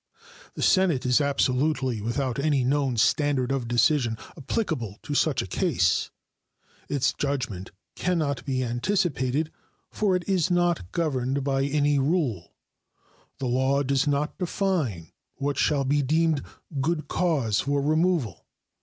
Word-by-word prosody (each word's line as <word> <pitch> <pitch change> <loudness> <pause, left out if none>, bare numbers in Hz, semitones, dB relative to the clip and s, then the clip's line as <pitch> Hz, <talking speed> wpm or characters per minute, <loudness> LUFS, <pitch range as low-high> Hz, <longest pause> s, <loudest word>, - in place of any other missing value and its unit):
The - - -3
Senate 185 -9 +3
is 125 +3 +3
absolutely 135 -3 +1
without 125 +3 -2
any 140 -2 +2
known 135 -1 +1
standard 135 +1 +2
of 135 -3 -1
decision 120 0 +2 0.2
applicable 135 - -3
to 150 - -4
such 145 -2 +2
a - - -6
case. 145 - +1 0.8
Its 135 -3 +1
judgment 125 -10 -3 0.3
can 180 0 0
not 140 -4 -1
be 130 -2 -1
anticipated, 140 - 0 0.4
for 200 -3 +1
it 180 - -3
is 185 -3 +1
not 175 - +1
governed 135 -4 -1
by 135 0 +1
any 145 0 +2
rule. 135 - -1 0.8
The 135 - -4
law 130 +3 +1
does 140 +1 +1
not 145 +4 -1
define 165 - -1 0.2
what 140 0 -2
shall 145 -3 +2
be 145 +2 +2
deemed 155 +1 +1 0.4
good 155 +2 -1
cause 140 - +1
for 140 +1 0
removal. 155 - 0
140 Hz, 135 wpm, -26 LUFS, 125-160 Hz, 0.8 s, Senate